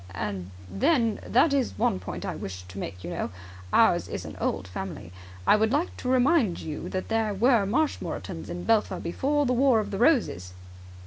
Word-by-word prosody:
"And 95 -1 -4 0.2
then, 225 - +1
that 280 +5 +4
is 270 -4 0
one 95 - +1
point 95 - -6
I - - -2
wish 95 -1 -6
to 95 +2 -9
make, 90 -2 -6
you 85 - -5
know. - - -3 0.4
Ours - - +4
is - - -5
an - - -8
old 90 - -1
family, 90 -1 -7 0.3
I - - +6
would 220 +1 +2
like 305 +6 0
to 250 - -4
remind 255 - +3
you 155 -2 -5
that 185 - -4
there 225 -2 0
were 230 -1 +3
Marshmoretons 295 +9 -2
in 175 0 -5
Belpher 215 -4 +2
before 285 +12 0
the 250 - +1
War 255 -2 +4
of 210 -1 -3
the 195 - -3
Roses." 225 - +2
215 Hz, 190 wpm, -27 LUFS, -, 0.4 s, I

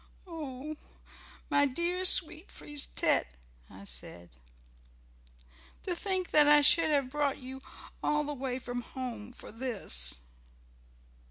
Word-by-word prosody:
"Oh, 305 -3 -7 0.7
my 285 0 +4
dear, 345 +7 -1
sweet 335 -1 +4
Frise 295 -1 -2
tête," - - +1 0.4
I 95 +1 -13
said. 85 +3 -6 1.5
"To 360 - -3
think 375 -1 -1
that 300 -1 +6
I 295 0 +7
should 320 +2 +5
have 280 -4 0
brought 290 -1 -1
you 265 0 -8 0.4
all 300 0 0
the 295 0 -4
way 260 -2 -4
from 245 -1 -5
home 240 -3 -7
for - - -12
this." 200 - +1
280 Hz, 120 wpm, -30 LUFS, 245-310 Hz, 1.5 s, I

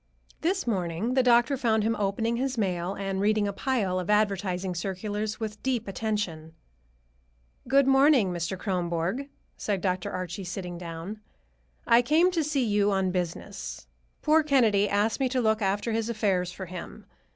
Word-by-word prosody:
This 370 +4 0
morning 190 +1 -1
the 260 - +4
doctor 240 +2 +4
found 225 -4 +1
him 225 +1 +1
opening 225 +3 -1
his 265 0 -2
mail 185 -2 -1
and 195 -1 -3
reading 210 0 +2
a 200 - -2
pile 200 -6 0
of 180 - -5
advertising 195 -3 +1
circulars 205 +5 -3
with 215 -2 -5
deep 250 -4 -1
attention. 190 -6 -3 1.1
"Good 275 +1 +4
morning, 270 -7 +4
Mr. 170 +2 -3
Kronborg," 180 +7 -2 0.3
said 205 -2 -1
Dr. 185 -1 -1
Archie, 185 +1 -4
sitting 180 -1 -5
down. 170 +4 -7 0.7
"I 235 +1 +6
came 315 +8 +3
to 335 -3 0
see 285 -4 0
you 205 -1 +2
on 190 -1 +1
business. 180 -2 -4 0.4
Poor 310 +1 +5
Kennedy 230 -9 +3
asked 205 +4 +1
me 265 -2 +1
to 255 0 0
look 220 -2 +2
after 205 +3 0
his 225 +1 -1
affairs 195 -6 0
for 190 +1 -7
him. 180 0 -9
205 Hz, 160 wpm, -27 LUFS, 185-240 Hz, 1.1 s, I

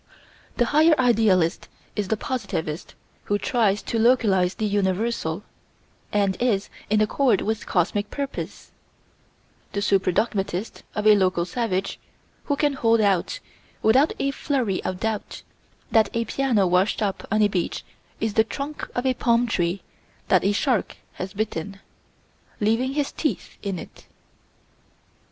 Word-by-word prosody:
The 240 - +3
higher 310 0 +5
idealist 215 -9 +3 0.3
is 205 -2 -1
the 220 - 0
positivist 195 -11 -4 0.3
who 205 - +1
tries 205 -2 +1
to 230 - -2
localize 210 -7 +3
the 215 - -2
universal, 200 -2 -1 0.7
and 200 -2 +1
is 210 -5 +1 0.2
in 215 0 +3
accord 220 0 +2
with 220 0 -2
cosmic 205 +3 0
purpose: 280 -1 -5 1.0
the 200 - -1
super 195 -2 +2
dogmatist 200 0 -1
of 210 -1 -2
a 215 - +8
local 185 -3 +2
savage 195 -1 -2 0.5
who 285 - +1
can 290 0 +1
hold 230 -3 +3
out, 200 - +1 0.5
without 260 +8 +4
a 275 - 0
flurry 260 - -1
of 185 -1 -3
doubt, 220 -2 -3 0.5
that 220 -2 +4
a 230 0 0
piano 245 -8 +1
washed 185 +4 +2
up 195 -2 -3
on 215 0 +3
a - - +6
beach 185 -4 -2 0.3
is 220 -1 -1
the 220 - +4
trunk 280 +6 -6
of 245 - -1
a 260 - +3
palm 235 -1 +2
tree 180 -4 -1 0.5
that - - +4
a 200 - +3
shark 230 +1 0 0.2
has 185 +1 -6
bitten, 200 -2 -3 0.8
leaving 225 +5 +1
his 290 -2 0
teeth 305 - -3
in 195 -3 -3
it. - - -11
215 Hz, 140 wpm, -24 LUFS, 195-240 Hz, 1.0 s, a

